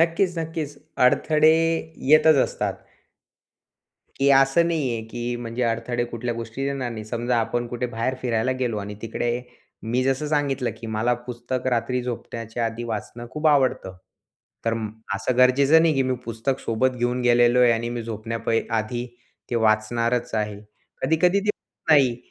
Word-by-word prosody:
नक्कीच, 170 +2 +2
नक्कीच. 160 -3 -4 0.3
अडथळे 155 +4 +4 0.6
येतच 155 0 +7
असतात. - - -2 1.4
की 135 0 +2
असं 135 +5 +5
नाही 155 -6 0
आहे 115 -1 -3
की 120 +1 -3
म्हणजे 120 +1 -4
अडथळे 120 +1 -1
कुठल्या 120 0 -4
गोष्टीत 115 +4 -4
येणार 135 -3 -2
नाही. 110 -2 -6
समजा 120 +2 -1
आपण 120 +2 -1
कुठे 120 +1 -3
बाहेर 120 +2 -2
फिरायला 120 0 +1
गेलो 120 -4 -1
आणि 105 0 -6
तिकडे 120 +2 -2 0.4
मी 120 +3 0
जसं 135 +3 0
सांगितलं 140 -4 0
की 115 - -6
मला 110 +2 0
पुस्तक 125 +1 -4
रात्री 125 0 0
झोपण्याच्या 115 -1 -4
आधी 115 +1 -5
वाचणं 120 +1 -5
खूप 155 +1 -2
आवडतं. 130 -10 +1 0.7
तर 115 - +1
म 110 -1 -3 0.3
असं 115 +5 -1
गरजेचं 140 +5 +5
नाही 165 -2 +3
की 135 - +2
मी 130 0 0
पुस्तक 115 +4 -2
सोबत 120 +3 +1
घेऊन 120 +1 0
गेलेलो 120 0 +4
आहे 125 -1 +6
आणि 115 +1 -1
मी 120 -1 -4
झोपण्या 115 0 -5
पहि 115 0 0 0.2
आधी 120 +3 -3 0.4
ते - - -1
वाचणारच 115 +2 +1
आहे. 105 -2 -2 0.4
कधी-कधी 180 +5 +3
ते 210 - -5
होतं 185 -5 -2
नाही. 130 -5 +4
120 Hz, 160 wpm, -24 LUFS, 115-135 Hz, 1.4 s, येतच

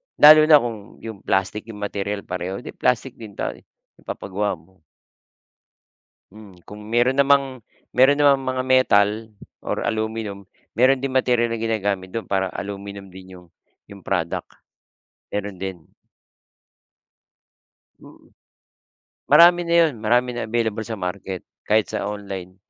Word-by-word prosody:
lalo 155 +1 +9
na 150 -2 +7
kung 115 -2 -3 0.3
yung 110 -3 -7
plastic 100 +4 -1
yung 105 -2 -9
material 100 0 -3
pareho, 95 +6 -5
di - - -7
plastic 125 0 -1
din 105 -3 -10
'to, - - -4 0.4
ipapagawa 100 +1 -3
mo. 85 +2 -25 1.5
Hmm, 100 -4 -15
kung 105 0 -10
meron 120 +4 +1
namang, 135 -3 +2 0.3
meron 140 +3 +5
namang 140 -2 +4
mga 130 0 -2
metal 115 -6 +4 0.5
or - - -2
aluminium, 110 -3 -3 0.3
meron 130 +3 +4
din 135 0 -3
materyal 120 -2 +2
na 115 - -3
ginagamit 100 -4 -2
dun 115 - -5
para 95 -1 -1
aluminium 100 0 -7
din 95 0 -13
yung 90 - -18 0.4
yung 100 -2 -13
product, 85 -4 -2 0.8
meron 100 -2 -5
din. 95 -4 -6 2.1
Mm. - - -18 1.0
Marami 175 +1 +7
na 170 - +2
yun, 150 - -5
marami 120 +3 +2
na - - -3
available 110 -1 -1
sa 110 - -4
market, 95 0 -5 0.3
kahit 110 0 +2
sa - - -3
online, 95 -3 -7
105 Hz, 130 wpm, -22 LUFS, 100-125 Hz, 2.1 s, lalo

